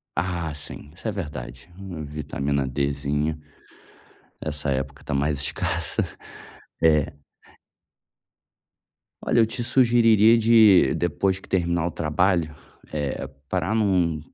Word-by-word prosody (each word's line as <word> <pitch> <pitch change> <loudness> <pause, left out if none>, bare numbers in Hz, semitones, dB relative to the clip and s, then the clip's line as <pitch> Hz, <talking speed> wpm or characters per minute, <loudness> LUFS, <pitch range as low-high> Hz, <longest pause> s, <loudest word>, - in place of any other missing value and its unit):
Ah, 85 -2 -2
sim, 75 0 -7
isso 95 - -8
é 110 - 0
verdade. 75 -6 -7
Uma 90 -5 -7
vitamina 70 -2 -2
Dzinha. 70 +3 -1 1.0
Essa 75 -1 -3
época 70 +1 -3
tá - - -4
mais 70 +1 0
escassa. 70 - -1 0.8
É. 75 -1 +3 2.1
Olha, - - +2
eu 115 - +6
te 115 +2 -4
sugeriria 115 -3 +5
de, 110 - +6
depois 95 +2 0
que - - -17
terminar 85 -2 0
o - - -3
trabalho, 80 0 0 0.4
eh, 75 -3 -3 0.2
para 95 +3 -1
num 90 -7 +1
80 Hz, 115 wpm, -24 LUFS, 70-95 Hz, 2.1 s, eu